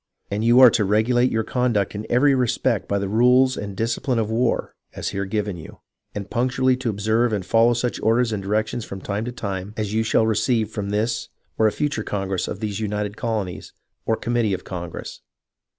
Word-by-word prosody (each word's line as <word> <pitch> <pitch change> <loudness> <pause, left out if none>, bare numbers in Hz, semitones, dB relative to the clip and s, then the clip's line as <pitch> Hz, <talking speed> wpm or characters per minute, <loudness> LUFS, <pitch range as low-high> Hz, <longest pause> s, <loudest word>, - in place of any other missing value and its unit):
And 105 +2 -1
you 120 +2 +5
are 125 -2 +9
to 110 - +2
regulate 115 +5 +2
your 110 0 0
conduct 120 -5 0
in 105 +1 -6
every 135 +4 +4
respect 125 -3 0
by 100 - 0
the 100 0 -2
rules 125 +5 +4
and 100 -2 -6
discipline 115 +2 -1
of 110 -1 -1
war 115 +1 0 0.2
(as - - -3
here 100 0 -3
given 100 -1 -2
you), 80 - -12 0.3
and 100 -1 -4
punctually 130 +1 +1
to 130 -2 -2
observe 110 +3 +1
and 100 -4 -2
follow 115 +3 +4
such 120 +1 -2
orders 115 0 +2
and 105 - -2
directions 110 +4 -1
from 95 -3 -7
time 105 +3 -3
to 125 - -4
time 100 -3 -5
as 105 -1 -2
you 110 - +2
shall 110 0 +2
receive 110 0 +1
from 100 -2 -4
this 110 +3 -1 0.3
or 110 - +3
a - - +2
future 140 -2 -2
Congress 95 -3 -2
of 100 - -6
these 105 -2 -3
United 105 -1 -2
Colonies, 110 -7 -4 0.3
or 110 - +3
committee 120 -4 0
of - - -9
Congress. 85 -2 -7
110 Hz, 200 wpm, -22 LUFS, 100-120 Hz, 0.3 s, are